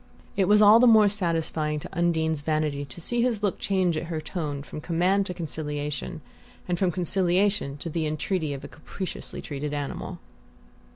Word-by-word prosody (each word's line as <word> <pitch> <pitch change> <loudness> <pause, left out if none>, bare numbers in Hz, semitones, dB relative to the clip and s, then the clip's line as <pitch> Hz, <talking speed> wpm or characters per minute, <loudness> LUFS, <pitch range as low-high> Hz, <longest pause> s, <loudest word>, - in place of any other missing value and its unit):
It 190 -2 +2
was 210 +1 +6
all 210 +2 +8
the 250 - +6
more 220 -2 +7
satisfying 165 -6 -1
to - - -8
Undine's 160 -3 +1
vanity 150 -2 -1
to 135 +3 -11
see 240 +8 0
his 235 -4 0
look 205 - 0
change 185 -4 +1
at 155 - -2
her 165 -2 -3
tone 150 -4 -4
from 150 - -8
command 180 +5 +1
to 180 - -3
conciliation, 150 0 -4 0.5
and 175 -1 -1
from 185 -2 +2
conciliation 180 -2 +1
to 145 - -6
the 160 -1 -1
entreaty 155 +1 -1
of 135 - -9
a - - -6
capriciously 185 +4 -7
treated 145 0 -4
animal. 145 -1 -4
170 Hz, 175 wpm, -26 LUFS, 150-190 Hz, 0.5 s, all